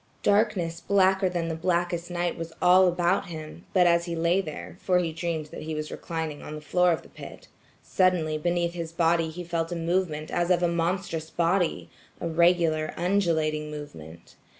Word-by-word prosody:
Darkness 200 -5 +2
blacker 190 -1 +3
than 175 -2 -2
the 165 - -2
blackest 175 +1 -1
night 175 0 -1
was 165 0 -6
all 185 +1 +6
about 180 +2 +1
him; 160 0 -9
but 180 -2 +4
as 170 0 +3
he 170 -1 -3
lay 170 +3 +2
there, 155 -5 -8
for 180 -1 +2
he 170 -3 0
dreamed 165 -1 -3
that - - -8
he 155 0 -4
was 155 0 -4
reclining 160 -3 -5
on 155 - -7
the - - -6
floor 180 +4 +2
of 165 - -1
the - - -15
pit, - - -11 0.4
suddenly 180 -5 +1
beneath 170 +2 0
his 165 -2 -5
body 165 -1 +2
he 175 +3 -7
felt 165 -1 -2
a - - -2
movement 165 -2 -1
as 175 0 0
of 180 -1 +3
a - - +4
monstrous 170 -1 -2
body–a 170 0 -2
regular 165 -2 +2
undulating 165 -5 0
movement. 85 - -10
170 Hz, 180 wpm, -26 LUFS, 160-180 Hz, 0.4 s, all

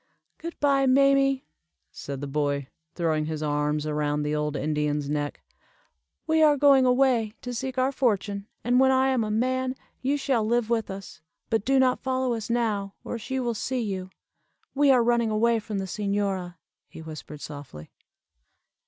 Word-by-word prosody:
"Good 335 +1 -7
bye, 275 -2 +3
mammie," 275 0 +4 0.5
said 140 -1 -7
the 145 - -4
boy, 145 -1 -1 0.3
throwing 160 -3 0
his 155 -1 -3
arms 150 0 0
around 150 -1 -1
the 150 0 -1
old 150 0 -1
Indian's 150 0 -1
neck; 145 0 -3 0.8
"we 320 -1 +2
are 300 -2 +5
going 275 -2 +5
away 250 -4 +2
to 245 - -4
seek 260 +2 -4
our 260 +1 +2
fortune, 205 -6 -1 0.2
and 245 +2 +3
when 265 0 +5
I 265 0 +3
am 255 -3 +1
a 215 - -3
man, 255 +4 0 0.3
you 275 +3 +1
shall 270 -5 +1
live 235 +1 0
with 225 -2 0
us. 190 -5 -8 0.3
But 225 -2 +1
do 270 +1 +3
not 255 -1 +3
follow 260 -1 0
us 225 -1 -5
now, 215 -4 -1
or 235 - -5
she 265 +4 -3
will 240 -2 -1
see 250 +3 -2
you. 190 -4 -4 0.6
We 285 0 +3
are 255 -3 +5
running 235 -1 +2
away 225 +2 +2
from 210 -1 -5
the 195 - -2
señora," 195 -2 -2 0.3
he 160 - -11
whispered 155 -1 -9
softly. 140 - -9
225 Hz, 170 wpm, -26 LUFS, 155-260 Hz, 0.8 s, are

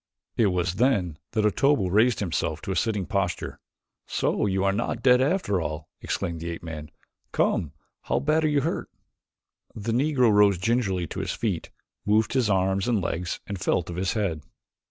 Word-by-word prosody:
It 110 - +3
was 90 -1 0
then 100 - +1
that 110 -2 +2
Otobu 105 -3 +2
raised 110 +4 +3
himself 80 -4 -1
to - - -3
a - - -1
sitting 105 0 0
posture. 100 -3 -2 0.5
"So - - 0
you 95 -1 0
are 100 - +3
not 115 +4 -2
dead 125 -1 +6
after 135 - +1
all," 75 0 -5
exclaimed 85 -1 -3
the 85 - -4
ape 85 - -6
man. 75 -2 -7 0.4
"Come, 75 -3 +1 0.3
how - - +1
badly 155 +3 +2
are - - 0
you 145 - +3
hurt?" 160 +5 -2 0.9
The 110 +1 -3
Negro 125 -1 +3
rose 100 -2 +5
gingerly 95 -2 0
to - - -6
his - - -2
feet, - - -2 0.3
moved 110 +2 +2
his 125 -5 +2
arms 95 +1 +1
and 120 -3 +2
legs 90 -1 -3
and 100 -2 -5
felt 85 -1 0
of - - -6
his 95 0 0
head. 95 -8 -1
100 Hz, 180 wpm, -26 LUFS, 90-120 Hz, 0.9 s, dead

